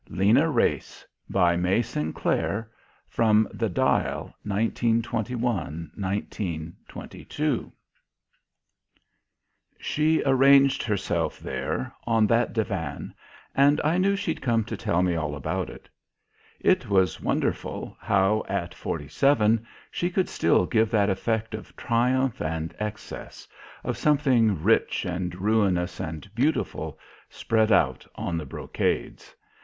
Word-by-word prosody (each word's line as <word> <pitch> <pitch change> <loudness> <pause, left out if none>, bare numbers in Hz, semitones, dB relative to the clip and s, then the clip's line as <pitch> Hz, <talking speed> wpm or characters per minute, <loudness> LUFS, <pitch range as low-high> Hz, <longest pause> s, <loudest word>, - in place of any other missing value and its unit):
LENA 110 - +3
WRACE 120 -6 0 0.2
By 85 -1 +3
MAY 90 +6 +2
SINCLAIR 100 +6 -2 0.4
(From 110 -1 +3
The 115 -2 -1
Dial) 90 - 0
1921, 115 - -1
1922 100 - -4 2.1
She 155 +1 +1
arranged 135 0 +5
herself 105 -4 -1
there, 65 - -3
on 115 -2 +4
that 115 +2 +2
divan, 100 -10 -3 0.4
and 145 +2 +4
I 165 +4 +2
knew 200 +2 +3
she'd 195 -5 -3
come 115 -3 +1
to 110 - -5
tell 105 -4 0
me 90 -1 +1
all 75 -3 -2
about 70 - -3
it. - - -12 0.7
It - - +2
was 95 -2 +2
wonderful, - - -2
how, 100 +2 +2
at - - -2
forty 75 - -5
seven, 115 - +2 0.2
she 175 - -1
could 185 0 0
still 85 +2 +2
give 110 +3 +2
that 105 -3 +2
effect 110 +3 -1
of 110 - -8
triumph 125 +2 +1
and 80 +1 -3
excess, 105 0 -7 0.4
of - - -2
something 125 - +3
rich 115 +1 +2
and 90 -1 -3
ruinous 95 -3 +1
and 80 +3 -5
beautiful 145 +7 -1 0.3
spread 110 -1 +1
out 65 - +2
on 85 - -3
the 80 -2 -3
brocades. - - -3
110 Hz, 115 wpm, -26 LUFS, 90-120 Hz, 2.1 s, arranged